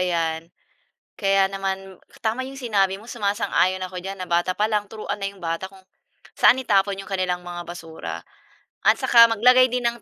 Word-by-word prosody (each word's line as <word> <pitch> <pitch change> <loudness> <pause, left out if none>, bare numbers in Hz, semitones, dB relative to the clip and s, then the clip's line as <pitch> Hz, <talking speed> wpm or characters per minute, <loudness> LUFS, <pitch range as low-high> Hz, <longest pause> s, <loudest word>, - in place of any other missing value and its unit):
'yan, 165 -2 -1 0.7
kaya 195 -1 +3
naman, 195 -1 -4 0.2
tama 230 +3 -1
'yong 270 0 -9
sinabi 195 -5 0
mo, 225 - -15
sumasang-ayon 200 -4 0
ako 185 0 -5
diyan, 195 +1 -7
na 185 - -7
bata 175 +2 +1
pa 210 +1 0
lang 210 -1 0
turuan 210 -1 -6
na 195 - -3
'yong 195 -2 -9
bata 165 +2 -3
kung, 190 0 -16 0.6
saan 260 - +5
itapon 200 -4 +1
'yong 195 - -11
kanilang 180 -2 -1
mga 175 0 -7
basura. 165 -2 -7 0.6
At - - +4
saka 230 -1 +6
maglagay 250 +3 +5
din 245 -1 0
ng 235 0 -3
195 Hz, 180 wpm, -23 LUFS, 180-220 Hz, 0.7 s, saka